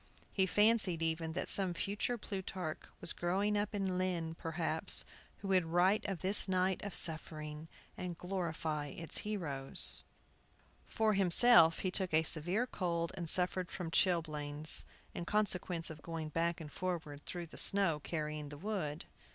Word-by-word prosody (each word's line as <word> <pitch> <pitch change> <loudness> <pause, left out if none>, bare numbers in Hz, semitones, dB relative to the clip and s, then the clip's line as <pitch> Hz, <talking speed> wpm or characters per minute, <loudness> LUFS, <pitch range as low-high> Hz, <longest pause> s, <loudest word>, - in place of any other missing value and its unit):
He 190 -2 +2
fancied, 205 -5 +3
even, 160 0 -2
that - - -3
some 185 -3 -2
future 205 +7 -2
Plutarch 190 -6 -5 0.2
was 170 - -1
growing 195 +4 0
up 205 +1 -1
in 190 -2 -1
Lynn, 175 -3 -2
perhaps, 160 -1 -1 0.3
who 195 - -7
would 185 -2 +3
write 180 +5 +2
of 190 -5 -4
this 195 +3 +6
night 185 0 0
of 205 -2 -5
suffering, 155 -1 +2 0.3
and 180 -2 -6
glorify 165 -5 -3
its 165 +3 -2
heroes. 155 -11 -1 0.9
For 220 -1 +1
himself 180 -3 +6
he 185 - -1
took 185 -4 +1
a 160 - +4
severe 175 +9 0
cold 170 -7 -2
and 170 -3 -5
suffered 180 0 0
from 170 -2 -6
chilblains, 155 -4 +2 0.3
in - - -5
consequence 180 -5 0
of 155 -1 -11
going 165 -1 -5
back 170 +2 -1
and 155 -3 -9
forward 160 -6 -5
through 175 -1 -5
the 160 - -13
snow, 195 -6 +5
carrying 150 -1 -5
the 145 - -9
wood. 165 -5 -4
175 Hz, 150 wpm, -34 LUFS, 160-190 Hz, 0.9 s, this